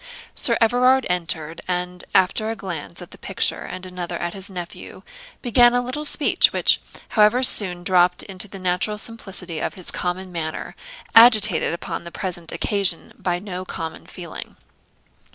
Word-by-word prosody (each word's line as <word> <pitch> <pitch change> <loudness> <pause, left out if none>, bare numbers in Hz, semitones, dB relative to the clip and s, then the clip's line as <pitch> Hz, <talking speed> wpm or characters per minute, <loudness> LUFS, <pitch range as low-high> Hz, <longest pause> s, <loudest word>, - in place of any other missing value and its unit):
Sir - - +4
Everard 250 +3 +3
entered, 165 -2 -3
and 180 0 -3
after 195 +4 +2
a 225 - -3
glance 160 - -6
at - - -15
the - - -12
picture - - 0
and 185 0 -8
another 180 -1 -5
at 175 0 -4
his 195 0 -6
nephew, 180 -2 -9 0.4
began 240 0 +5
a 245 - +2
little 260 +5 -4
speech, 295 0 +3
which, - - +3 0.3
however, 215 +4 +3
soon 180 -8 +4
dropt 180 -1 +3
into 195 +1 -5
the 195 - -10
natural 185 +3 -1
simplicity 195 -7 -5
of - - -3
his 185 - +3
common 180 +1 -4
manner, 160 -2 -5 0.4
agitated 220 -5 +6
upon 170 - -5
the 170 - -9
present 175 -3 -4
occasion 195 -5 -1
by 175 -1 -1
no 185 -1 -6
common 165 -3 -7
feeling. - - -8
185 Hz, 155 wpm, -22 LUFS, 175-215 Hz, 0.4 s, agitated